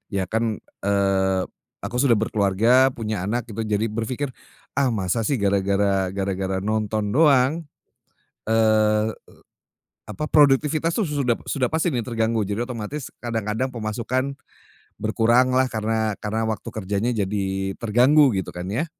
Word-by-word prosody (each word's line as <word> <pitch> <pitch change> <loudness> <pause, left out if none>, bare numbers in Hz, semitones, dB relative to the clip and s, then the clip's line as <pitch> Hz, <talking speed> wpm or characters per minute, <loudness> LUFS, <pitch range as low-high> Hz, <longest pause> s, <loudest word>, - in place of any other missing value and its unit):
ya 95 - +1
kan, 115 0 0 0.3
eee, 95 -1 +2 0.4
aku - - -5
sudah 130 -4 +4
berkeluarga, 110 +4 +3
punya 110 -6 -4
anak, 120 +3 -1
gitu 110 - -4
jadi 105 +1 0
berpikir, 125 +5 -3 0.4
"Ah 140 -1 +2
masa 100 0 -1
sih 140 - +1
gara-gara 100 -1 +1
gara-gara 95 -1 -2
nonton 110 0 -1
doang?" 145 +1 +4 0.9
Eee, 110 -1 +3 1.0
apa, - - -5
produktivitas 150 +3 +3
tuh 225 - +1
su 150 -1 -3
sudah 120 -2 +2
sudah 130 -3 0
pasti 160 +2 +1
nih 125 - 0
terganggu. 115 -2 0
Jadi 105 +4 -2
otomatis, 125 +4 -5
kadang-kadang 115 +1 -2
pemasukan 120 +5 -2 0.7
berkuranglah. 125 +3 +3
Karena 110 0 -1
karena 110 +1 -2
waktu 110 - -4
kerjanya 105 +2 -1
jadi 95 -2 -2
terganggu, 125 +5 +4
gitu 95 - -3
kan 90 +1 -5
ya. 145 +10 -1
110 Hz, 135 wpm, -23 LUFS, 100-125 Hz, 1.0 s, sudah